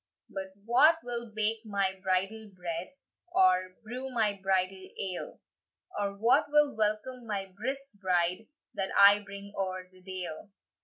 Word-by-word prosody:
"But 190 0 -5
wha 255 +8 +6
will 235 -2 -4
bake 220 +1 +1
my 200 -3 0
bridal 195 +4 -1
bread, 175 - -5 0.4
Or 185 - +3
brew 250 +4 -5
my 225 -5 +1
bridal 190 -1 -1
ale? 185 -2 -4 0.6
And 200 -1 -2
wha 240 +7 +5
will 295 -2 +3
welcome 220 +3 -1
my 195 -3 -3
brisk 270 +6 -4
bride, 180 +2 +1 0.3
That 195 -1 -1
I 200 +1 +8
bring 200 0 -9
oer 185 -1 -3
the 185 0 -19
dale?" 185 -1 -6
200 Hz, 140 wpm, -30 LUFS, 185-225 Hz, 0.6 s, I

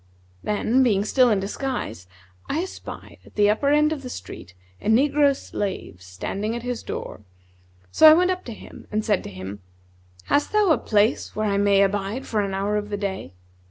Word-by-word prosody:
Then, 220 +5 +1
being 205 -6 +2
still 255 +2 +4
in 210 -3 +2
disguise 205 - -4 0.4
I 315 - 0
espied, 380 - -9
at - - -19
the 205 0 +4
upper 280 +7 0
end 300 +1 +3
of 295 - -6
the 255 - -7
street, 90 - -9 0.3
a - - -6
negro 280 +4 +4
slave 195 - -5
standing 195 - -4
at 240 - -5
his 245 -1 -3
door; - - -6 0.7
so 315 - +8
I - - +9
went 360 +2 +3
up 365 0 -3
to 235 - -6
him - - -13
and 215 0 -1
said 205 -4 +1
to - - -6
him, 95 +1 -8 0.6
'Hast 290 - 0
thou 420 -4 +4
a - - +3
place 210 +1 +1
where 215 - -1
I 200 -1 +1
may 200 -1 +4
abide 205 +5 -2
for 215 -2 0
an 195 -1 -2
hour 200 +2 0
of 210 0 -4
the 205 - -3
day?' 190 - -4
210 Hz, 195 wpm, -23 LUFS, 200-270 Hz, 0.7 s, I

